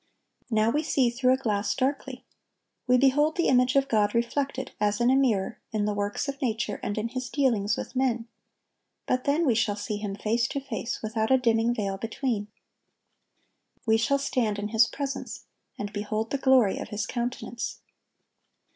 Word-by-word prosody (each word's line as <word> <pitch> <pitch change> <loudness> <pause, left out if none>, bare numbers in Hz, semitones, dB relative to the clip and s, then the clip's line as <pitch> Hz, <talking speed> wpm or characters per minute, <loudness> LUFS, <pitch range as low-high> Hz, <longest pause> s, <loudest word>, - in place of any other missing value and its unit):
"Now 220 -1 +2
we 295 - +1
see 265 -5 +2
through 255 +1 +3
a - - +2
glass, 210 -5 -1
darkly."(1192) 265 -1 -2 0.7
We 250 - +7
behold 290 +4 +3
the 340 - +2
image 250 0 +3
of 275 0 +3
God 215 -3 +2
reflected, 265 +3 -1
as 210 0 +1
in 240 +1 +4
a - - +4
mirror, 230 -8 +1
in 215 -2 0
the 210 - 0
works 205 +6 -2
of 275 0 -5
nature 230 -3 -1
and 205 - -3
in 220 +2 -1
His 255 0 -4
dealings 230 -8 +1
with - - -6
men; 245 -3 0 0.8
but 255 0 0
then 300 +4 +2
we 255 - +4
shall 220 -2 +1
see 205 +1 -4
Him 205 -1 -4
face 230 +3 0
to 280 - -3
face, 245 -4 -5
without 220 0 -1
a 265 - +6
dimming 235 -1 +2
veil 195 -3 -2
between. 225 -1 -2 1.4
We 220 -1 +4
shall 255 +5 +2
stand 240 -6 0
in 205 +1 -3
His 225 +1 +4
presence, 275 +1 -5 0.3
and 205 0 -5
behold 215 +2 -3
the 280 - -1
glory 260 -7 +4
of - - -5
His 210 0 -2
countenance. 240 -1 -4
235 Hz, 180 wpm, -27 LUFS, 215-265 Hz, 1.4 s, We